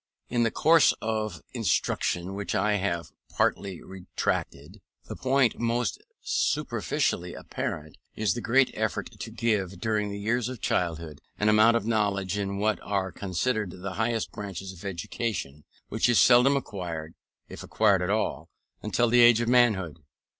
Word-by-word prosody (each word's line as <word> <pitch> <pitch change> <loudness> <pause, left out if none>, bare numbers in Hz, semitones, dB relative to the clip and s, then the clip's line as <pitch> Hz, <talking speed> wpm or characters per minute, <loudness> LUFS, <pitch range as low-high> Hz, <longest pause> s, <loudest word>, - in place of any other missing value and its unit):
In 120 -1 +1
the 115 - +3
course 160 +6 +4
of 110 -4 -3
instruction 90 +2 -1
which 100 0 -3
I 105 -1 +2
have 85 -4 -2 0.2
partially 95 -4 -1
retraced, 95 -1 -4 0.3
the - - -7
point 130 -2 +1
most 120 -2 -1 0.2
superficially 90 0 -1
apparent 75 0 -5 0.2
is 105 -5 +1
the 120 - -5
great 130 +4 +3
effort - - -2
to - - -5
give, 100 -5 -1
during 105 -1 -1
the 100 - -5
years 115 +4 -1
of 130 -3 -7
childhood, 80 -6 -2 0.2
an 105 - +2
amount 110 +2 +5
of 105 - -4
knowledge 100 -4 0
in 100 -1 -2
what 105 +1 0
are 95 -2 -2
considered 100 +3 -2
the 100 -1 -4
higher 115 +2 0
branches 95 -2 -6
of 90 - -14
education, 85 -5 -4 0.2
which 110 +2 +1
is 120 - +4
seldom 125 +3 +6
acquired 85 -10 -5 0.3
(if - - -9
acquired 100 -4 +2
at 90 - -1
all) 110 +2 -1 0.3
until 120 - +1
the 120 +1 +5
age 120 -1 +7
of 120 - -1
manhood. 105 -10 +3
105 Hz, 155 wpm, -27 LUFS, 95-115 Hz, 0.3 s, age